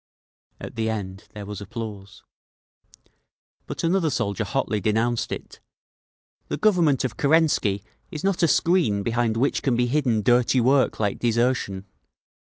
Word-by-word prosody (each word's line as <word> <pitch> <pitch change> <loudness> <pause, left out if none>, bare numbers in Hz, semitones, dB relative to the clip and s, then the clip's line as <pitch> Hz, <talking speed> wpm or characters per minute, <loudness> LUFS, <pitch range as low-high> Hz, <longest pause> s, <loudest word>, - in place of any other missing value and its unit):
At - - -8
the 110 0 0
end 100 -2 -5
there 105 -1 -7
was 105 0 -7
applause. 100 -2 -8 1.4
But - - -5
another 165 -1 +2
soldier 110 -6 -2
hotly 105 -2 -1
denounced 110 +3 0
it: - - -7 0.9
"The - - -3
Government 170 - +3
of 120 - -4
Kerensky 140 - +2 0.3
is 155 - -7
not 195 -2 0
a 170 - +5
screen 160 - +2
behind 115 0 0
which 135 +4 +1
can 130 -3 +1
be 120 +1 +2
hidden 120 -5 +1
dirty 125 +3 +3
work 130 0 +2
like 105 -2 -1
desertion! 115 -5 0
120 Hz, 140 wpm, -24 LUFS, 105-140 Hz, 1.4 s, a